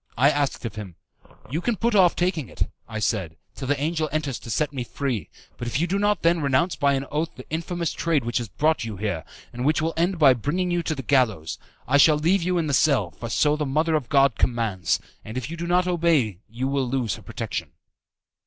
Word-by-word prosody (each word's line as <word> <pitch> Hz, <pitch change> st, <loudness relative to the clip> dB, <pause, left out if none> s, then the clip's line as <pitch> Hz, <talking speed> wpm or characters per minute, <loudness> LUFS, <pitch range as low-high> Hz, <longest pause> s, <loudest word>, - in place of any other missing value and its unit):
I 140 Hz, +5 st, +5 dB
asked 140 Hz, -4 st, -1 dB
of 115 Hz, -, -4 dB
him, 100 Hz, -5 st, -8 dB, 0.6 s
"You 160 Hz, +5 st, -1 dB
can 235 Hz, +4 st, 0 dB
put 235 Hz, +3 st, 0 dB
off 185 Hz, -4 st, +5 dB
taking 170 Hz, -, -1 dB
it," -, -, -1 dB, 0.3 s
I 110 Hz, -, -5 dB
said, 95 Hz, -7 st, -1 dB, 0.2 s
"till 135 Hz, -, -6 dB
the 145 Hz, +1 st, +1 dB
angel 155 Hz, +1 st, -1 dB
enters 150 Hz, -4 st, -2 dB
to -, -, -11 dB
set 150 Hz, +5 st, 0 dB
me 130 Hz, -3 st, -3 dB
free; 125 Hz, -3 st, -3 dB, 0.3 s
but 120 Hz, -, -5 dB
if 120 Hz, -, -1 dB
you 170 Hz, -, +2 dB
do 190 Hz, +3 st, -1 dB
not 205 Hz, -2 st, +1 dB
then 170 Hz, 0 st, +3 dB
renounce 145 Hz, +6 st, +2 dB
by 140 Hz, -1 st, +2 dB
an 135 Hz, 0 st, -1 dB
oath 155 Hz, +2 st, 0 dB
the 130 Hz, -, -10 dB
infamous 170 Hz, +1 st, -2 dB
trade 155 Hz, -7 st, 0 dB
which 120 Hz, 0 st, 0 dB
has 120 Hz, -, -4 dB
brought 155 Hz, -, +1 dB
you 110 Hz, -3 st, -5 dB
here, 95 Hz, -5 st, -2 dB, 0.3 s
and 120 Hz, +1 st, -4 dB
which 150 Hz, +4 st, +2 dB
will 160 Hz, +1 st, -1 dB
end 175 Hz, +3 st, +1 dB
by 140 Hz, -5 st, +7 dB
bringing 160 Hz, -, -1 dB
you 175 Hz, 0 st, +1 dB
to 160 Hz, -2 st, -2 dB
the 135 Hz, -, -6 dB
gallows, 110 Hz, -, +1 dB, 0.3 s
I 140 Hz, -, +4 dB
shall 150 Hz, +1 st, +6 dB
leave 170 Hz, +5 st, +2 dB
you 180 Hz, +1 st, 0 dB
in 165 Hz, -, +1 dB
the 145 Hz, -, -1 dB
cell, 140 Hz, 0 st, +3 dB
for 115 Hz, -, -7 dB
so 150 Hz, +7 st, +3 dB
the 150 Hz, -, -2 dB
Mother 155 Hz, +4 st, +1 dB
of 150 Hz, -6 st, 0 dB
God 140 Hz, -3 st, +3 dB
commands, 110 Hz, -8 st, +1 dB, 0.2 s
and 110 Hz, +3 st, -7 dB
if 130 Hz, +4 st, -4 dB
you -, -, -4 dB
do 170 Hz, +1 st, -4 dB
not 180 Hz, +1 st, +3 dB
obey 160 Hz, -, +2 dB
you 120 Hz, +4 st, -3 dB
will 135 Hz, -1 st, 0 dB
lose 125 Hz, -4 st, 0 dB
her -, -, -8 dB
protection." -, -, -5 dB
145 Hz, 235 wpm, -24 LUFS, 120-165 Hz, 0.6 s, by